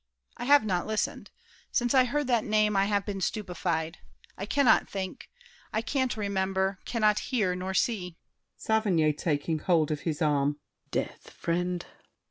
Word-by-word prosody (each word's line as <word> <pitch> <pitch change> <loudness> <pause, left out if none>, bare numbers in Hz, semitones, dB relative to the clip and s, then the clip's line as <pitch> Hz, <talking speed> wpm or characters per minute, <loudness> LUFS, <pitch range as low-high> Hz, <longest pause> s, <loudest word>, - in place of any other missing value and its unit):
I 245 - -4
have 285 -3 +6
not 180 -4 0
listened. 215 -1 -2 0.4
Since 245 +1 +1
I 260 -2 +6
heard 295 +4 -1
that 240 -4 +2
name 215 -1 +2
I 195 0 +4
have 205 -1 0
been 195 -2 -4
stupefied. 175 -5 -2 0.4
I 195 - -5
cannot 280 0 +4
think: 190 -2 -5 0.4
I 220 - -1
can't 260 -1 0
remember, 190 -1 0
cannot 215 -3 +2
hear 215 -8 +1
nor 185 +1 -4
see! 180 -6 0 0.4
SAVERNY 190 -9 +2
(taking 155 +1 -1
hold 160 -2 +2
of 150 - -1
his 155 -2 -3
arm). 145 -1 +1 0.3
Death, - - -4
friend! 175 +1 -2
195 Hz, 150 wpm, -28 LUFS, 175-220 Hz, 0.4 s, have